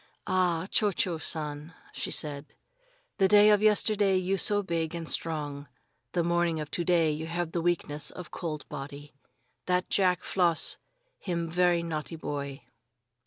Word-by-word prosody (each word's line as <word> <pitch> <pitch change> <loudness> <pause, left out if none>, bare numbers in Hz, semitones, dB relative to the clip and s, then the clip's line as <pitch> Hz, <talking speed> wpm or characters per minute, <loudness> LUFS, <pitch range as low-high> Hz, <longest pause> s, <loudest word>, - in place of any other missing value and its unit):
"Ah, 180 -2 +1
Cho 210 -2 +3
Cho 175 -2 -1
San," 150 0 -4 0.2
she - - -3
said, 145 -1 -1 0.6
"the 190 - +5
day 210 +1 +7
of 210 -1 +4
yesterday 210 -2 +3
you 185 +1 0
so 205 +1 +2
big 165 -2 -2
and 165 -1 -5
strong. 145 -4 -2 0.5
The 175 - +1
morning 170 -1 +1
of 150 -1 -6
to 175 - -1
day 170 -2 +3
you 155 +2 -4
have 170 0 -2
the 170 - -1
weakness 155 -4 0
of 180 -4 -9
cold 155 -4 -5
body. 145 0 -8 0.5
That 180 0 0
Jack 185 -3 +2
Floss 175 -3 +1 0.4
him 170 -3 -3
ve'y 175 -1 +3
naughty 165 0 -4
boy!" 140 -3 -5
170 Hz, 155 wpm, -29 LUFS, 155-180 Hz, 0.6 s, day